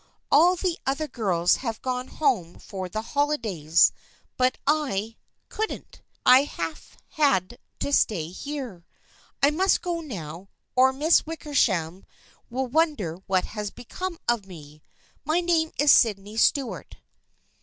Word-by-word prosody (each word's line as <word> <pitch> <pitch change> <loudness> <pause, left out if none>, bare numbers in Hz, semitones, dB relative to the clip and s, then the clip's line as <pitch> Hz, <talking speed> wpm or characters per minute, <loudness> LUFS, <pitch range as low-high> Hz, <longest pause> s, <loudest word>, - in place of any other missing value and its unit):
All 340 +6 +6
the 360 -1 -2
other 275 +3 -1
girls 185 - +1
have 230 -4 -4
gone 255 0 -2
home 235 - -1
for 185 -2 -7
the 215 +4 -4
holidays 220 - +2 0.4
but 255 0 +1
I 245 -8 0 0.2
— - - -51
couldn't. 440 +1 -5 0.2
I 255 +3 +7
have 165 - -6
had 255 - +1 0.2
to 285 - -1
stay 170 - +2
here. 250 -4 -7 0.6
I 285 - +6
must 375 +5 +2
go 350 -2 -2
now, 185 - -8 0.3
or 260 +1 +5
the 265 - -12
Miss 315 +4 +4
Wickershams 195 - 0 0.5
will 260 +3 -2
wonder 255 - 0
what 185 -1 +1
has 210 -1 -5
become 360 - -6
of 235 -5 0
me. 150 -4 -12 0.4
My 310 +4 +1
name 335 -2 +1
is 290 -1 +5
Sydney 210 -1 +3
Stuart." 255 +3 0
250 Hz, 135 wpm, -25 LUFS, 190-300 Hz, 0.6 s, I